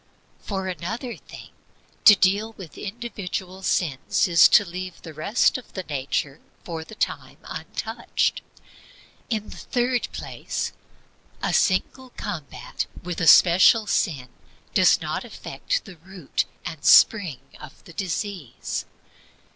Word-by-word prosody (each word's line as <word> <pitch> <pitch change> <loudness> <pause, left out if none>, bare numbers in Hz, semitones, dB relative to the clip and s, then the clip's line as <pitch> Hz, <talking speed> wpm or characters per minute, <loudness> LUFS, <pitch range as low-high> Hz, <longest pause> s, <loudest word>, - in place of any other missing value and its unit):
For 190 -2 -4
another 225 +7 -4
thing, - - -12 0.6
to 210 - +11
deal 200 +4 +2
with 185 -7 -11
individual 195 -4 -6
sins 160 -6 +1
is 170 -3 +7
to 205 - +6
leave 180 0 -7
the 160 - -9
rest 200 - +2
of 250 - -18
the 190 - -4
nature 140 -1 -3 0.2
for 165 -2 -5
the 220 - -12
time - - -3
untouched. - - -2 0.9
In 215 -3 -2
the - - -10
third 245 0 0
place, - - -4 0.7
a - - 0
single 250 +7 +1
combat 140 -10 -5 0.2
with 180 0 -4
a 165 - +1
special 185 +7 +7
sin 140 - -1 0.4
does - - +5
not - - -3
affect - - -4
the 185 -3 -12
root 180 -2 -3 0.2
and 160 - -6
spring 180 - +5 0.2
of 130 - -13
the 170 - -14
disease. 185 - -4
185 Hz, 125 wpm, -24 LUFS, 160-210 Hz, 0.9 s, to